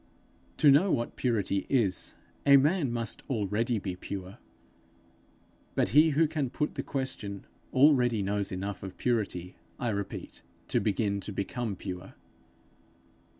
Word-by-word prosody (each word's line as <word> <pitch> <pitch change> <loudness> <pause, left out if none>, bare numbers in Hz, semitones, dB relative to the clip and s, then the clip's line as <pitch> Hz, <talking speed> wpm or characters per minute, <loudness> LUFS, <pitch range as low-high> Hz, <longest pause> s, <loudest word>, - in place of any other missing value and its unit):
To 145 - +7
know 170 +8 +5
what 120 - -1
purity 105 -5 0
is, 105 -9 +1 0.3
a 140 -1 +8
man 145 -1 +2
must 115 -2 -3
already 115 0 0
be 95 -3 -4
pure; 95 +3 -7 1.4
but - - +2
he 155 +3 +6
who 160 0 +5
can 150 -4 -2
put 150 +4 -2
the - - -3
question, 110 -8 -4 0.3
already 125 -6 +4
knows 100 0 -1
enough 95 +1 -4
of 95 -1 -8
purity, 100 -7 -1 0.2
I 120 - -1
repeat, 100 -2 -5 0.3
to - - +2
begin 100 -1 0
to 100 - -6
become 105 +2 -3
pure. 90 0 -7
115 Hz, 135 wpm, -29 LUFS, 100-135 Hz, 1.4 s, a